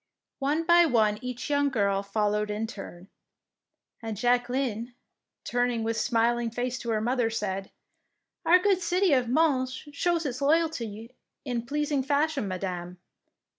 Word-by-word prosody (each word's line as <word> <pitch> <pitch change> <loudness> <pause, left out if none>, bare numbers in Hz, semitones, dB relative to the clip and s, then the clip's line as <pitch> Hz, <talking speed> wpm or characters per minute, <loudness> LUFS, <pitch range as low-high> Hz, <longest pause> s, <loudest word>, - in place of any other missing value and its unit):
One 290 +4 0
by 345 0 +6
one 215 -5 +2
each 250 -1 -5
young 285 -1 +2
girl 200 -6 +1
followed 210 +1 0
in 210 +2 -2
turn, 195 -4 -9 0.9
and 225 -2 -5
Jacqueline, 245 0 0 0.5
turning 245 -1 0
with 225 0 -1
smiling 235 +1 +1
face 245 +2 -3
to 235 - -6
her 220 -1 +1
mother, 240 0 +1
said, 195 -3 -3 0.4
— - - -55
"Our 355 - +8
good 380 0 +2
city 360 -1 +2
of 250 -3 +2
Mons 260 -2 +2 0.2
shows 335 +3 0
its 255 -2 -3
loyalty 255 -8 0 0.3
in 240 -3 -3
pleasing 295 0 0
fashion, 285 -2 0
Madame. 180 -1 -4
245 Hz, 140 wpm, -27 LUFS, 215-285 Hz, 0.9 s, Our